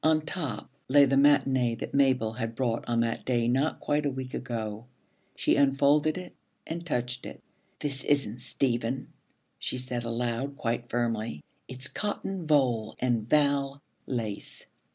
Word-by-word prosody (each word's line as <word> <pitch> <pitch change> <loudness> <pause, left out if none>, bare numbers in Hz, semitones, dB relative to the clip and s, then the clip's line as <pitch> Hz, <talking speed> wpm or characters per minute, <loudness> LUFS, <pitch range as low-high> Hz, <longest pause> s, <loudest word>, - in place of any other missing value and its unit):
On 155 0 +4
top 145 - -4 0.2
lay 140 +2 +7
the 135 0 +2
matinée 135 -4 +4
that - - -6
Mabel 130 -5 +3
had 115 -1 -4
brought 120 -2 0
on 115 -1 +2
that 115 -1 -1
day 120 -2 +1
not 135 +6 +1
quite 150 +1 0
a 145 - +1
week 130 -1 -5
ago. 115 -2 -4 0.5
She - - +2
unfolded 140 +3 +4
it 180 -1 -8 0.3
and 170 +1 -4
touched 125 -5 -2
it. - - -9 0.4
'This 140 -2 -1
isn't 125 -5 +1
Stephen,' 125 0 -1 0.5
she - - -2
said 125 -1 -2
aloud, 120 +3 -2
quite 120 -4 -2
firmly. 115 -8 -1 0.2
'It's 130 +1 -2
cotton 195 -3 -3
voile 125 -7 +2
and 120 -3 0
val 140 -1 +2 0.3
lace. 110 -5 -4
130 Hz, 150 wpm, -28 LUFS, 115-140 Hz, 0.5 s, lay